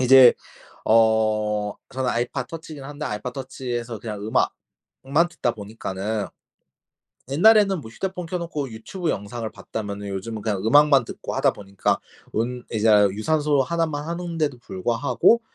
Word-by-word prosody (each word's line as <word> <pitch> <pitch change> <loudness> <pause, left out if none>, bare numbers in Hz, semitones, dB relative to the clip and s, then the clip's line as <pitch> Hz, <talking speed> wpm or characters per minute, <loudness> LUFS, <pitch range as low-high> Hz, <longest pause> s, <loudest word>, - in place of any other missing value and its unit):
이제 130 -1 +8 0.5
어 110 -2 +3 0.2
저는 130 -1 -2
아이팟 120 +2 -1
터치긴 155 -2 -8
한데 145 +2 -6
아이팟 105 +1 -3
터치에서 125 -3 -5
그냥 105 -2 -6 0.8
음악만 150 +6 +3
듣다 150 -7 -1
보니까는 105 -1 -4 1.0
옛날에는 195 +4 +5
뭐 110 - -10
휴대폰 180 +6 -4
켜놓고 165 -6 -3
유튜브 160 +11 -5
영상을 110 +2 -4
봤다면은 100 -2 -6
요즘은 105 +3 -5
그냥 105 -3 -1
음악만 140 +2 +6
듣고 - - -6
하다 - - +2
보니까 100 -2 -1 0.3
운 125 +2 -2
이제 110 -1 0 0.3
유산소 145 +5 +2
1 165 +3 0
만 145 -1 -4
하는데도 165 -5 -2
불구하고 120 - +2
125 Hz, 315 characters per minute, -24 LUFS, 110-150 Hz, 1.0 s, 이제